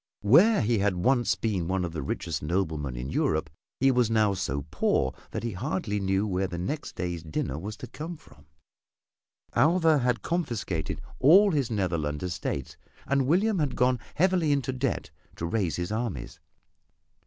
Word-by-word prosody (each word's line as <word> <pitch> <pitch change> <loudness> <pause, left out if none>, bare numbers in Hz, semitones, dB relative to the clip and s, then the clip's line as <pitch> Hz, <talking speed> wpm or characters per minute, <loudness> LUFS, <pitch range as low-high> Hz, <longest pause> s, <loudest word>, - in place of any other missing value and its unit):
Where 180 - +6
he 115 -1 +1
had 100 -1 +1
once 120 +7 +2
been 100 -7 -1
one 95 0 0
of 85 - -6
the 80 - -3
richest 75 +2 -3
noblemen 75 -5 -1
in 60 +3 -5
Europe, 80 -1 0 0.3
he 135 +1 +5
was 125 -3 +2
now 110 -3 +3
so 70 -7 -3
poor 65 0 +1 0.2
that - - -5
he 115 - -2
hardly 105 - -2
knew 95 +1 +1
where 95 -1 0
the 90 -1 -6
next 145 - -4
day's 85 -2 -3
dinner 75 -2 -3
was 105 +5 -6
to - - -7
come 165 +2 -7
from. 75 - -20 1.1
Alva 160 +3 +4
had 125 -3 0
confiscated 120 - -2 0.2
all 195 +9 +7
his 140 -7 0
Netherland 85 -8 -1
estates, 85 -6 -4 0.3
and 140 -1 +1
William 195 +6 +2
had 145 -5 0
gone 125 0 +2 0.2
heavily 175 -2 +3
into 135 -2 0
debt 130 - -2 0.2
to 85 - -4
raise 90 -4 0
his 90 +2 -3
armies. 110 - -4
105 Hz, 165 wpm, -27 LUFS, 85-135 Hz, 1.1 s, all